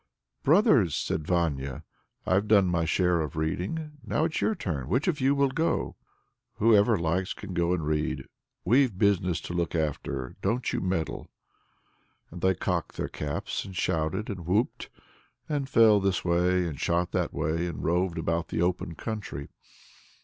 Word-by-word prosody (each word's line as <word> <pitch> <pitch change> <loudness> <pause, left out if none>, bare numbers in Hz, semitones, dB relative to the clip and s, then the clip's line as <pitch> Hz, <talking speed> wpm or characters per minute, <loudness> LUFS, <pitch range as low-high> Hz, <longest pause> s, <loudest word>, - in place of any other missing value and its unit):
"Brothers!" 145 - +4
said 80 -1 -2
Vanya, 70 -7 -1 0.4
"I've 100 +3 +2
done 105 -3 +5
my 85 -2 +1
share 90 0 +2
of 75 -3 -4
reading. 145 - -3
It's 160 0 0
your 220 - +1
turn 75 - -3
now; - - -12
which 135 +9 +1
of 155 -6 0
you 135 +2 +3
will 140 -1 +2
go?" 165 +4 -1 0.6
"Whoever 110 0 +4
likes 85 +3 -1
can 100 -3 -8
go 85 0 +1
and 85 -4 0
read. 75 +1 -1 0.4
We've 120 0 +3
business 95 -4 +2
to - - -6
look 85 -1 -1
after; 70 -4 -3
don't 115 +5 0
you - - -1
meddle." 90 -4 -2 1.0
And 85 +1 -9
they 95 0 +3
cocked - - -2
their - - -2
caps, 75 -1 -3
and 95 -2 -9
shouted, 80 +7 -1
and 90 -5 -6
whooped, 105 +7 0 0.6
and 140 -3 -2
flew 110 -4 +6
this 95 -2 0
way, 90 +1 +2
and 75 -4 -6
shot 85 +1 0
that - - 0
way, 80 +3 -1
and 85 - -5
roved 90 +1 +1
about 85 +1 -1
the - - -3
open 90 -1 -1
country. 105 -11 -5
90 Hz, 165 wpm, -27 LUFS, 80-110 Hz, 1.0 s, flew